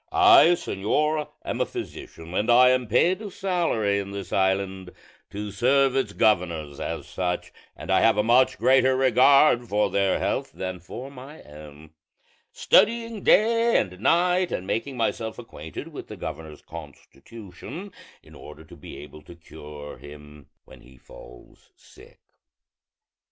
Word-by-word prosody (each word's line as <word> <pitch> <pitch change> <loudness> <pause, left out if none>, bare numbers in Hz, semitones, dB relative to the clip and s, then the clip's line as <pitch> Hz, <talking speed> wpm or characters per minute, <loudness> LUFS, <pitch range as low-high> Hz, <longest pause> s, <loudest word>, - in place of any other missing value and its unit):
I, 370 -2 +7
señor, 150 - -1 0.2
am - - -3
a - - +2
physician, 80 +1 -9
and 105 +5 -1
I 125 +1 +6
am 125 -1 +1
paid 175 - +2
a 210 - -6
salary 170 - -1
in 100 -1 -6
this 100 -1 -7
island 95 -1 -1 0.4
to 105 0 -6
serve 130 +6 +2
its 130 -6 0
governors 85 -10 0
as - - -5
such; 90 -1 -4 0.2
and - - -7
I 95 - +3
have 115 -2 +3
a 105 - +2
much 120 +3 +3
greater 130 +2 +3
regard 130 -1 +4
for 105 +1 0
their 100 -1 +1
health - - -3
than 95 -1 -6
for 125 +10 -9
my 140 +3 -12
own, 75 +1 -14 0.6
studying 230 -1 +2
day 230 +3 +3
and 90 -3 -3
night 180 - +2
and 90 - -4
making 125 +6 -3
myself 115 -1 -2
acquainted 80 -10 -9
with - - -10
the - - -10
governor's 80 -1 -8
constitution, 90 - -11 0.3
in - - -18
order - - -12
to - - -15
be - - -11
able 75 +1 -12
to 85 - -14
cure 75 -3 -11
him 75 0 -14 0.2
when - - -16
he 65 +1 -19
falls - - -16
sick. - - -19
105 Hz, 150 wpm, -24 LUFS, 85-135 Hz, 0.6 s, I